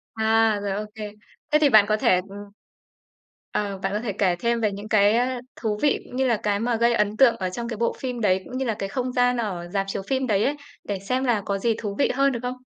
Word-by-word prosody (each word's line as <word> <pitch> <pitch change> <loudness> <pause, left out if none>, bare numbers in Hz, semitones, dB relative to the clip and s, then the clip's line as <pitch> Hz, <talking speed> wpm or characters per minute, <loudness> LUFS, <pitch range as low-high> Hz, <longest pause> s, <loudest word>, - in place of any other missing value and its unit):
À, 220 -1 +3
rồi, 200 -1 -2
ô 210 +2 -3
kê. 210 -1 -6 0.4
Thế 300 - +5
thì 295 -2 +4
bạn 215 -3 +7
có 215 0 +2
thể, 185 - +3
ừm 200 - -9 1.1
ờ, 200 -2 -2
bạn 195 +1 -3
có 210 - 0
thể 215 -4 -3
kể 185 -3 +1
thêm 235 0 0
về 210 -2 +1
những 205 +2 -8
cái, 205 0 +4
ơ, 250 0 0 0.2
thú 215 -2 -2
vị 290 -2 +2
cũng - - -11
như 265 0 +1
là 235 - +2
cái 205 -1 +1
mà 235 +1 0
gây 235 +1 +3
ấn 210 -1 0
tượng 265 -4 +6
ở 185 -1 -2
trong 235 +5 -5
cái 230 -3 -5
bộ 235 - 0
phim 250 -3 -4
đấy, 190 -3 +2
cũng 255 - -6
như 265 - -1
là 225 -3 -1
cái 195 - -3
không 255 +3 -2
gian 245 0 +2
ở 185 -7 -3
rạp 195 -1 0
chiếu - - -3
phim 265 -1 0
đấy 205 -1 +2
ấy, 290 +2 0 0.3
để 200 -2 -4
xem 255 +7 -1
là 235 -5 +1
có 200 -1 -1
gì 225 +3 0
thú 205 -3 -4
vị - - +3
hơn, 275 +1 +3
được 235 - -3
không? 250 +1 -4
220 Hz, 275 wpm, -24 LUFS, 205-245 Hz, 1.1 s, bạn